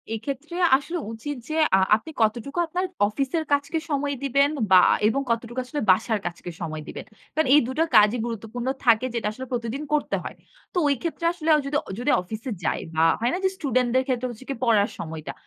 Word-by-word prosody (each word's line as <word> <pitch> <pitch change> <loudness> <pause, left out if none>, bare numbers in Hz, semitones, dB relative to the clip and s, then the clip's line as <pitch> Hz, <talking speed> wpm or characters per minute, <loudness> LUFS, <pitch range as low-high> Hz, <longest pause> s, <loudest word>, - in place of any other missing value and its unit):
এক্ষেত্রে 280 +8 -6 0.2
আসলে 330 +6 -5
উচিত 260 +6 -5
যে, 310 - -2 0.2
আ - - +3 0.2
আপনি 225 +9 -6
কতটুকু 235 +8 0
আপনার 360 +3 -1 0.2
অফিসের 275 +9 -1
কাজকে 285 +3 0
সময় 285 0 -1
দিবেন 280 +1 +3 0.2
বা 185 -1 +9 0.3
এবং 270 +6 +1
কতটুকু 235 +1 -2
আসলে 290 +3 -4
বাসার 220 +3 +1
কাজকে 175 0 -5
সময় 155 -2 -4
দিবেন? - - -7 0.3
কারণ 315 -2 +1
এই 300 - +7
দুটো 270 +5 0
কাজই 215 +3 +6
গুরুত্বপূর্ণ 230 +1 -5 0.2
থাকে, 230 +1 +5
যেটা 230 -2 -1
আসলে 260 +4 -7
প্রতিদিন 240 +3 -3
করতে 300 - +1
হয়। - - -7 0.4
তো - - -3
ওই 280 - +3
ক্ষেত্রে 335 0 -3
আসলে 325 -2 -3
অ - - +3
যদি, 280 +1 -3
অ - - -10
যদি 250 +4 +1
অফিসে 220 +7 -7
যাই - - 0 0.2
বা 160 - +3 0.2
হয় 235 +2 +1
না? - - 0
যে, - - +4
স্টুডেন্টদের 255 -5 +1
ক্ষেত্রে 255 -1 -1
হচ্ছে 240 +3 -12
কি 275 - -2
পড়ার 220 -4 +3
সময়টা। 160 -1 -6
250 Hz, 200 wpm, -24 LUFS, 220-285 Hz, 0.4 s, বা